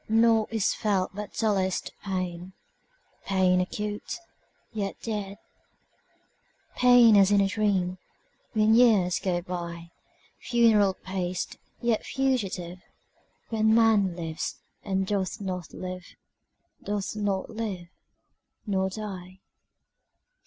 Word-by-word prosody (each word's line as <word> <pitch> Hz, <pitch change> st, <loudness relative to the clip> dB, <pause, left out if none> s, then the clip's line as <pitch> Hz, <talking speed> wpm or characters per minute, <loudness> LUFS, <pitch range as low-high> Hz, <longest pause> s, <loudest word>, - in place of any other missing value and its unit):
Naught 225 Hz, 0 st, +3 dB
is 220 Hz, -3 st, +1 dB
felt 195 Hz, -3 st, 0 dB
but 205 Hz, +1 st, -6 dB
dullest 195 Hz, -4 st, 0 dB
pain, 185 Hz, -2 st, -4 dB, 0.7 s
Pain 185 Hz, -2 st, +3 dB
acute, 210 Hz, -, -4 dB, 0.6 s
yet 200 Hz, -3 st, -3 dB
dead; 205 Hz, -3 st, -4 dB, 1.4 s
Pain 245 Hz, -3 st, +7 dB
as 195 Hz, -1 st, +6 dB
in 205 Hz, -1 st, +4 dB
a 195 Hz, -, +3 dB
dream, 195 Hz, -3 st, 0 dB, 0.5 s
When 215 Hz, 0 st, +4 dB
years 215 Hz, -7 st, +4 dB
go 175 Hz, -2 st, -1 dB
byFuneral 185 Hz, +5 st, -1 dB
paced, 185 Hz, -1 st, -3 dB, 0.2 s
yet 235 Hz, -3 st, +1 dB
fugitive, 195 Hz, -10 st, -2 dB, 0.7 s
When 220 Hz, -1 st, +3 dB
man 215 Hz, -5 st, +4 dB
lives, 165 Hz, -2 st, -4 dB, 0.3 s
and 190 Hz, -1 st, 0 dB
doth 195 Hz, +1 st, -2 dB
not 185 Hz, -4 st, -5 dB
live, 185 Hz, 0 st, -7 dB, 0.7 s
Doth 205 Hz, 0 st, -3 dB
not 200 Hz, -3 st, -2 dB
live—nor 190 Hz, -1 st, -6 dB
die. 190 Hz, -3 st, -7 dB
195 Hz, 95 wpm, -27 LUFS, 185-215 Hz, 1.4 s, Pain